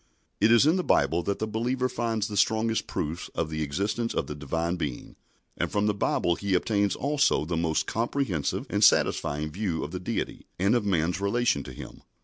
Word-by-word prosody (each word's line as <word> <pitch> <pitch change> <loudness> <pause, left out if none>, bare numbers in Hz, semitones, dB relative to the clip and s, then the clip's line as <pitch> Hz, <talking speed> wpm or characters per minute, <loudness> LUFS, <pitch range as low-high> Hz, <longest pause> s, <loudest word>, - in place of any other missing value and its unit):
It 110 +3 +4
is 120 +3 +6
in 160 +5 +4
the 180 - 0
Bible 85 - +2
that 100 +3 -2
the 110 - -2
believer 120 +4 -1
finds 115 -3 -1
the 105 - -6
strongest 110 +2 +1
proofs 80 +3 -4
of 80 - -2
the 80 0 -3
existence 100 +10 -2
of - - 0
the - - -5
Divine 80 +4 -2
Being, 75 -8 -5 0.4
and - - -2
from 105 0 +1
the 105 - +2
Bible 85 -3 +1
he 100 +2 -1
obtains 100 +1 +1
also 145 - +1
the 85 +2 -2
most 80 -1 0
comprehensive 115 - -1
and - - 0
satisfying 75 -1 +3
view 90 -3 -2
of 75 - -5
the 90 - -4
Deity 90 - -4
and 100 +4 +2
of 120 -4 +1
man's 90 0 0
relation 100 -5 +1
to - - -8
Him. - - -10
100 Hz, 200 wpm, -27 LUFS, 80-115 Hz, 0.4 s, is